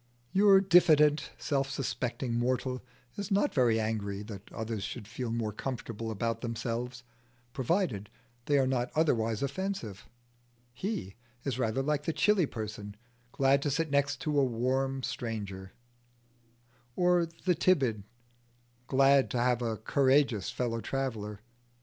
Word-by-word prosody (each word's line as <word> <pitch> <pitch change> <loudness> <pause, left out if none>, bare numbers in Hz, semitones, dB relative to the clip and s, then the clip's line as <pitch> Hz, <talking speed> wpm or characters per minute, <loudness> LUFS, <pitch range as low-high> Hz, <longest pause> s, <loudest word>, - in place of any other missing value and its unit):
Your 195 0 +6
diffident 160 -5 +5
self 135 -2 -1
suspecting 125 -1 -2
mortal 125 +2 0 0.4
is 200 -1 -4
not 205 +8 +2
very 120 -4 +3
angry 105 -2 -2
that 105 -2 -10
others 110 -1 -4
should 100 0 -6
feel 120 +2 -4
more 115 -2 -2
comfortable 115 -2 -5
about 115 +2 -2
themselves, 120 +1 -4 0.5
provided 130 - 0 0.4
they 145 - +3
are 135 - +3
not 125 -2 0
otherwise 115 -8 +1
offensive: 140 - -4 0.6
he 125 - -4 0.3
is 130 -3 -2
rather 120 +2 0
like 150 0 -1
the 165 - 0
chilly 200 -5 +3
person, 105 -3 -6 0.4
glad 135 +2 +3
to 145 - 0
sit 155 +2 -1
next 140 -1 +1
a 155 - 0
warmer 135 0 +1 0.2
neighbour; 100 -5 -5 1.2
or 180 -1 +3
the 165 +2 -1
timid, 140 - +2 0.9
glad 135 0 +4
to - - -2
have 125 0 +2
a 115 -2 -1
courageous 130 -3 +2
fellow 115 -2 -2
traveller. 110 -7 -3
130 Hz, 130 wpm, -30 LUFS, 115-145 Hz, 1.2 s, Your